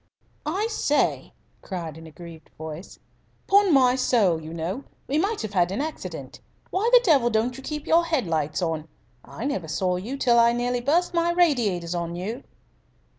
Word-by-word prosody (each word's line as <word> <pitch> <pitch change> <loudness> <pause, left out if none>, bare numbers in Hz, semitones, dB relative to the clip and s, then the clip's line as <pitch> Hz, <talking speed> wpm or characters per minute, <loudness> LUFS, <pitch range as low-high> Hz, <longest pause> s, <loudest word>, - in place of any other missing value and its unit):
"I 380 +8 0
say," 360 -10 0 0.3
cried 170 -5 -6
an 160 0 -11
aggrieved 165 0 -12
voice, 160 +3 -8 0.5
"'pon 400 -1 +4
my 260 -4 +5
soul, 210 -10 +2
you 155 0 -8
know, 170 +10 -4 0.2
we 290 +3 +1
might 405 +5 -1
have 210 -2 -5
had 180 -2 +2
an 195 - -2
accident. 310 +2 -6 0.3
Why 410 +5 +1
the - - +8
devil 280 - +4
don't 230 +2 0
you 270 - -9
keep 300 +2 -5
your 335 +1 +4
head 315 - 0
lights 155 0 -1
on? 160 -2 -2 0.4
I 230 - -7
never 195 - -2
saw 180 +3 0
you 230 +10 -5
till 240 -3 +4
I 235 0 +5
nearly 245 0 -1
burst 335 +8 +1
my 340 0 +2
radiators 225 - +1
on 170 -1 -3
you!" 215 +9 -5
235 Hz, 180 wpm, -25 LUFS, -, 0.5 s, the